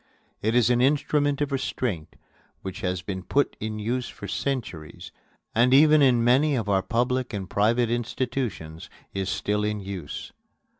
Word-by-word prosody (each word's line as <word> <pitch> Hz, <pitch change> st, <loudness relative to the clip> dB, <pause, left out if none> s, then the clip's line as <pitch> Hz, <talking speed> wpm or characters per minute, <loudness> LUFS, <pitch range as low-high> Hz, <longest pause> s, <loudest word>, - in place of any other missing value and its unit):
It 110 Hz, +2 st, 0 dB
is 125 Hz, 0 st, +4 dB
an 120 Hz, 0 st, +3 dB
instrument 145 Hz, +1 st, +2 dB
of 145 Hz, -1 st, 0 dB
restraint 125 Hz, -, -3 dB, 0.5 s
which 95 Hz, -1 st, -6 dB
has 90 Hz, -2 st, -2 dB
been 95 Hz, -2 st, -5 dB, 0.4 s
in 110 Hz, 0 st, -4 dB
use 120 Hz, +4 st, -2 dB
for 100 Hz, -, -9 dB
centuries 95 Hz, -, -4 dB, 0.4 s
and 125 Hz, +3 st, +4 dB
even 155 Hz, +1 st, +6 dB
in 125 Hz, -4 st, +4 dB
many 135 Hz, +5 st, +4 dB
of 115 Hz, -5 st, -2 dB
our 95 Hz, -2 st, +2 dB
public 125 Hz, +5 st, -1 dB
and 100 Hz, -2 st, -4 dB
private 115 Hz, +4 st, +2 dB
institutions 120 Hz, -9 st, -3 dB, 0.2 s
is 95 Hz, -1 st, -2 dB
still 105 Hz, +1 st, -1 dB
in 105 Hz, 0 st, -1 dB
use. 95 Hz, -7 st, -7 dB
115 Hz, 150 wpm, -25 LUFS, 100-130 Hz, 0.5 s, even